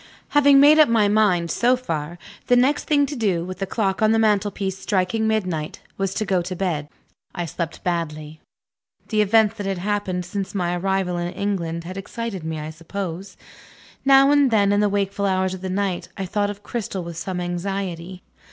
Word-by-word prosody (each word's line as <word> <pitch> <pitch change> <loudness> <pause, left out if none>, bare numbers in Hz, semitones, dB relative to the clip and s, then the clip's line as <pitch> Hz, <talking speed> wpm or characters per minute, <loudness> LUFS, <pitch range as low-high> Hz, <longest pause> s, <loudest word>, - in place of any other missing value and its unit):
Having 285 -1 +6
made 295 +2 +7
up 305 - +7
my 220 -3 +4
mind, 200 -5 +2
so 245 +2 +3
far, 170 -9 -4 0.3
the 245 - +5
next 260 +4 +2
thing 290 -2 +3
to 285 - -6
do 190 -8 0
(with 185 0 -7
the 195 - -2
clock 195 -1 -1
on 215 0 +4
the 225 - +3
mantel 210 -2 +2
piece 195 -2 -3
striking 210 +3 0
midnight) 180 -8 -2 0.2
was 195 -1 -2
to 215 - -1
go 190 -3 +1
to 180 +2 -5
bed. 165 -6 -2 0.5
I 175 - -2
slept 165 +1 -5
badly. 155 -3 -3 0.7
The 215 -2 +2
events 220 +1 +3
that 205 -2 -4
had 195 -1 -1
happened, 190 -2 -2
since 195 +2 -5
my 175 -2 0
arrival 190 -1 -1
in 175 0 -3
England, 170 -5 -2
had 185 +3 -7
excited 200 -2 -5
me 160 -1 -4
I 155 +1 -6
suppose. 180 +3 -6 0.7
Now 275 0 +6
and 285 -2 +4
then, 205 -3 +3
in 205 - +3
the 210 0 +3
wakeful 200 0 -1
hours 190 -1 0
of 185 - -7
the 190 - -4
night, 190 -1 -2
I 195 - -3
thought 205 +2 -1
of 205 0 -8
Cristel 215 -5 -4
with 170 0 -7
some 180 +2 -4
anxiety. 180 0 -4
195 Hz, 200 wpm, -22 LUFS, 175-215 Hz, 0.7 s, made